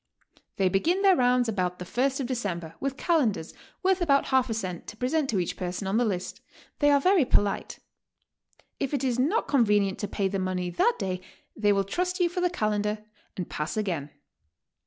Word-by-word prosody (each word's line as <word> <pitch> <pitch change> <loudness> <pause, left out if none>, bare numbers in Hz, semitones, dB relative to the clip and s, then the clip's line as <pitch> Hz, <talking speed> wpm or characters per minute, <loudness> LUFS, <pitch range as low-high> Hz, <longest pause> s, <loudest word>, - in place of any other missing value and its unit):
They 195 - +2
begin 330 - +1
their 385 -2 +6
rounds 250 -2 +3
about 180 -5 -1
the 180 - -7
first 265 +7 0
of 270 - -1
De 255 - -2
cember, 175 -9 -4
with 275 0 -3
calendars, 240 - +1 0.3
worth 375 0 +2
about 280 -5 +3
half 260 -2 +3
a - - 0
cent, 185 -6 -5
to 215 - -9
present 270 +4 0
to 215 - 0
each 175 -2 -1
person 180 +2 -4
on 195 +3 0
the 245 - +3
list. 185 -4 -3 0.4
They 290 - +4
are 285 -1 +5
very 365 +2 +4
polite. 205 -5 0 1.0
If 275 +1 -1
it 275 - -2
is 250 -2 0
not 325 - +1
convenient 210 -7 +2
to 205 - -2
pay 200 -1 -1
the 195 0 -2
money 185 -1 -2
that 460 - +2
day 185 -1 -3 0.3
they 205 -1 +2
will 200 -1 +2
trust 360 - -2
you 350 -1 +3
for 360 +1 -3
the 360 - +2
calendar 210 -6 -1 0.3
and 180 - -3
"pass 150 +6 -4
again." 170 -9 -2
220 Hz, 200 wpm, -27 LUFS, 190-280 Hz, 1.0 s, their